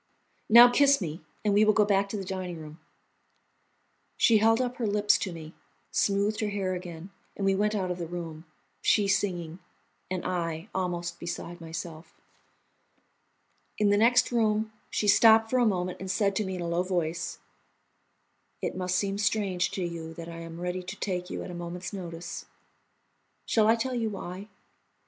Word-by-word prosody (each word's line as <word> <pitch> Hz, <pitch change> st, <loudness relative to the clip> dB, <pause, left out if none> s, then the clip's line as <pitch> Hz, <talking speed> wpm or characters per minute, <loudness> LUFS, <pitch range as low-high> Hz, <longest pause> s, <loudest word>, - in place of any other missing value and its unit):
"Now, 235 Hz, +2 st, +10 dB
kiss 280 Hz, +3 st, +4 dB
me, 165 Hz, -3 st, -5 dB, 0.2 s
and 205 Hz, -, +3 dB
we 205 Hz, +1 st, +5 dB
will 215 Hz, 0 st, +5 dB
go 210 Hz, -, +5 dB
back 200 Hz, -1 st, +2 dB
to 210 Hz, -, -3 dB
the 195 Hz, -, -5 dB
dining 185 Hz, -2 st, -4 dB
room." 155 Hz, +1 st, -10 dB, 1.4 s
She 225 Hz, -2 st, +5 dB
held 225 Hz, +2 st, +4 dB
up 250 Hz, -1 st, -2 dB
her 230 Hz, -, -1 dB
lips 205 Hz, 0 st, +3 dB
to 190 Hz, -, -3 dB
me, 160 Hz, -1 st, -9 dB, 0.4 s
smoothed 205 Hz, +2 st, +1 dB
her 215 Hz, -3 st, 0 dB
hair 195 Hz, -2 st, -2 dB
again, 180 Hz, 0 st, -7 dB, 0.3 s
and 200 Hz, -, -2 dB
we 195 Hz, -, +4 dB
went 210 Hz, +2 st, +1 dB
out 185 Hz, -3 st, -1 dB
of 180 Hz, -, -4 dB
the 170 Hz, -, -4 dB
room, 165 Hz, -2 st, -7 dB, 0.4 s
she 205 Hz, -2 st, +3 dB
singing, 180 Hz, -4 st, -1 dB, 0.5 s
and 185 Hz, -1 st, -3 dB
I 170 Hz, 0 st, -3 dB
almost 175 Hz, -2 st, -3 dB
beside 175 Hz, 0 st, -6 dB
myself. 165 Hz, 0 st, -8 dB, 1.6 s
In 205 Hz, -1 st, +3 dB
the -, -, +5 dB
next 245 Hz, +4 st, +4 dB
room 220 Hz, -2 st, +1 dB, 0.2 s
she 210 Hz, -, -1 dB
stopped 225 Hz, +1 st, +6 dB
for 255 Hz, -, +3 dB
a 240 Hz, -, +4 dB
moment 180 Hz, -3 st, -1 dB
and 190 Hz, -, -6 dB
said 200 Hz, 0 st, +1 dB
to 215 Hz, -, 0 dB
me 190 Hz, 0 st, -3 dB
in 180 Hz, -, -5 dB
a 170 Hz, -, -3 dB
low 170 Hz, +1 st, +1 dB
voice: 175 Hz, -2 st, -2 dB, 1.2 s
"It -, -, -3 dB
must 180 Hz, 0 st, -1 dB
seem 195 Hz, +1 st, 0 dB
strange 195 Hz, -3 st, +1 dB
to 190 Hz, -, -3 dB
you 165 Hz, -2 st, -5 dB
that 165 Hz, 0 st, -8 dB
I 170 Hz, 0 st, -8 dB
am 165 Hz, 0 st, -8 dB
ready 180 Hz, +1 st, -3 dB
to 180 Hz, -, -7 dB
take 180 Hz, -2 st, -3 dB
you -, -, -4 dB
at 185 Hz, -, -7 dB
a -, -, -7 dB
moment's 175 Hz, +3 st, -6 dB
notice. 170 Hz, -3 st, -7 dB, 1.0 s
Shall 215 Hz, -2 st, +3 dB
I 225 Hz, -, +6 dB
tell 255 Hz, +3 st, -2 dB
you 230 Hz, -3 st, -1 dB
why? 195 Hz, 0 st, -7 dB
190 Hz, 180 wpm, -28 LUFS, 175-210 Hz, 1.6 s, Now